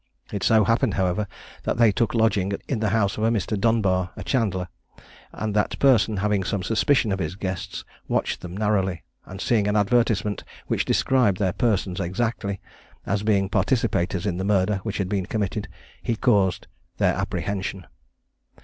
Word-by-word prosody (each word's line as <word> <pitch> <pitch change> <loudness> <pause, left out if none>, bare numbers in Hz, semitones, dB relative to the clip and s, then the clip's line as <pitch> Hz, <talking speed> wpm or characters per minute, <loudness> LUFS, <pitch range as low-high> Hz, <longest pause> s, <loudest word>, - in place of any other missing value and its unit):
It 100 - -2
so 110 -1 +4
happened, 115 +4 +2
however, 95 +2 0 0.3
that - - -2
they 115 -2 +5
took 115 +4 0
lodging 110 -4 +2
in 130 - -1
the 110 -1 +1
house 100 -1 +1
of - - -1
a 115 - +4
Mr. 105 -2 0
Dunbar, 100 -4 +1
a - - -7
chandler, 100 -8 0 0.6
and 110 -1 -3
that 105 0 0
person 115 -6 +4
having 100 0 +1
some 95 -1 -2
suspicion 115 +3 +2
of 95 - -1
his 80 0 -3
guests, 95 0 -5 0.2
watched - - -1
them 90 +1 -7
narrowly; 95 -4 0 0.2
and 95 +1 -8
seeing 105 -1 +1
an 105 - +1
advertisement 105 -1 +1 0.2
which - - 0
described 125 -8 +2
their 95 -3 0
persons 100 -6 0
exactly, 100 +1 -2 0.5
as 100 +1 0
being 100 -2 +2
participators 95 -4 0
in 90 -4 -1
the 95 - -2
murder 100 0 +2
which 110 -1 -4
had 95 - -1
been 95 -1 -2
committed, 105 0 -2 0.3
he 115 - -1
caused 100 -6 +2 0.3
their - - +3
apprehension. 95 -2 -3
100 Hz, 165 wpm, -24 LUFS, 95-110 Hz, 0.6 s, they